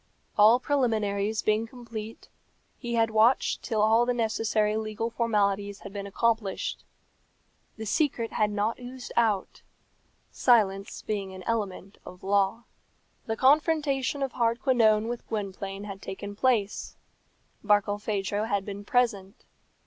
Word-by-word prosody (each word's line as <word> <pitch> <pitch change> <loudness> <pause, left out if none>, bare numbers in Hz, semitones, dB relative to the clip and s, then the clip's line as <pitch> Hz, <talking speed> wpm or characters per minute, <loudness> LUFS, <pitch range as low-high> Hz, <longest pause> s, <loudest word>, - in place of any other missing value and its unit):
All 215 +4 +6
preliminaries 220 -6 0
being 215 +1 +1
complete, 225 -2 -8 0.5
he 240 -2 -3
had 225 -1 +2
watched 220 +4 +3
till 215 -3 0
all 225 +2 +5
the 245 - +1
necessary 220 -2 +1
legal 220 +1 -3
formalities 205 -3 0
had 200 - -9
been 200 -1 -5
accomplished. 220 -1 -1 0.9
The 220 - -6
secret 235 -1 0
had 210 -1 +2
not 210 +3 -1
oozed 250 0 -8
out, 220 -5 +1 0.7
silence 200 -5 +2
being 195 -3 -3
an 185 - -9
element 200 -3 -3
of 180 0 -12
law. 200 +3 +1 0.6
The 225 0 -2
confrontation 285 -1 +2
of 270 - -2
Hardquanonne 230 -2 +2
with 240 0 -5
Gwynplaine 195 -2 -4
had 195 -1 -8
taken 200 +1 -7
place. 215 -3 0 0.7
Barkilphedro 205 0 0
had 200 -2 -1
been 205 0 -6
present. 205 -4 0
215 Hz, 125 wpm, -27 LUFS, 200-235 Hz, 0.9 s, All